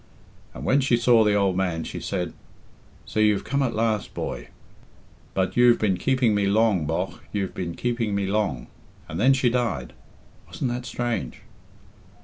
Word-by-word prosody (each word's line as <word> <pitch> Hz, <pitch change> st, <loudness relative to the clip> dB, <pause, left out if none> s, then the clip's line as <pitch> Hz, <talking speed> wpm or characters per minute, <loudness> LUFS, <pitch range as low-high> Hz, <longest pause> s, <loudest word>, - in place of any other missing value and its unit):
And 65 Hz, -, -7 dB
when 135 Hz, -, +4 dB
she 130 Hz, -3 st, +3 dB
saw 120 Hz, -1 st, +5 dB
the 105 Hz, -1 st, +3 dB
old 100 Hz, -2 st, +2 dB
man 90 Hz, -3 st, -1 dB
she -, -, -6 dB
said, 90 Hz, -4 st, -3 dB, 0.7 s
'So -, -, -3 dB
you've 105 Hz, -2 st, +3 dB
come 140 Hz, 0 st, -1 dB
at 125 Hz, -4 st, 0 dB
last, 110 Hz, -2 st, -1 dB
boy; -, -, -4 dB, 0.9 s
but 95 Hz, -1 st, 0 dB
you've 120 Hz, -1 st, +6 dB
been 100 Hz, -4 st, +1 dB
keeping 130 Hz, +2 st, +2 dB
me 100 Hz, -1 st, +1 dB
long, 100 Hz, -6 st, +2 dB
bogh, 80 Hz, -, -2 dB
you've 100 Hz, -2 st, -2 dB
been 85 Hz, -2 st, -4 dB
keeping 115 Hz, -4 st, -1 dB
me 100 Hz, -1 st, 0 dB
long.' 95 Hz, -, -1 dB, 0.4 s
And 80 Hz, -, -5 dB
then 130 Hz, +5 st, +5 dB
she 130 Hz, -1 st, +2 dB
died. 115 Hz, -, -1 dB, 0.5 s
Wasn't 125 Hz, -, -3 dB
that 125 Hz, 0 st, -4 dB
strange?" 120 Hz, -2 st, -3 dB
105 Hz, 165 wpm, -24 LUFS, 95-120 Hz, 0.9 s, you've